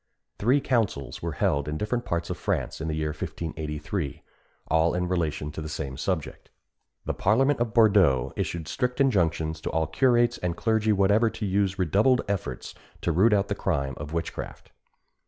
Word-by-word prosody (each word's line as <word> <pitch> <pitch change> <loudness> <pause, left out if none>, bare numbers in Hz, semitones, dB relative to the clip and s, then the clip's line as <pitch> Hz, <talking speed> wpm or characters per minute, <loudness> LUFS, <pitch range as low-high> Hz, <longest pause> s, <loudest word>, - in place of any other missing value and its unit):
Three 125 +7 +3
councils 105 - -1
were 85 -1 -3
held 75 -4 0
in 75 +1 -2
different 120 +5 -2
parts 85 -1 -2
of - - -4
France - - -2
in 80 - -3
the 80 - -1
year 80 0 -1
1583, 75 0 -4 0.4
all 80 +1 +2
in 90 0 0
relation 80 -4 -1
to 80 - -6
the 75 - -5
same 70 -3 -4
subject. 85 +1 -3 0.6
The - - -1
parliament 135 +7 +2
of 120 -1 -1
Bourdeaux 100 - +4
issued 85 -3 -3
strict 125 - -2
injunctions 80 - +1
to - - -3
all 80 0 0
curates 120 0 +2
and 85 -1 -2
clergy 110 -1 +1
whatever 105 +3 +3
to 110 -1 -5
use 100 0 +1
redoubled 105 - +3
efforts 100 -2 -4 0.3
to 85 - 0
root 95 +8 +4
out 100 -1 +2
the - - -1
crime 70 -9 -1
of 75 +1 -7
witchcraft. 85 0 -5
90 Hz, 175 wpm, -26 LUFS, 80-110 Hz, 0.6 s, Bourdeaux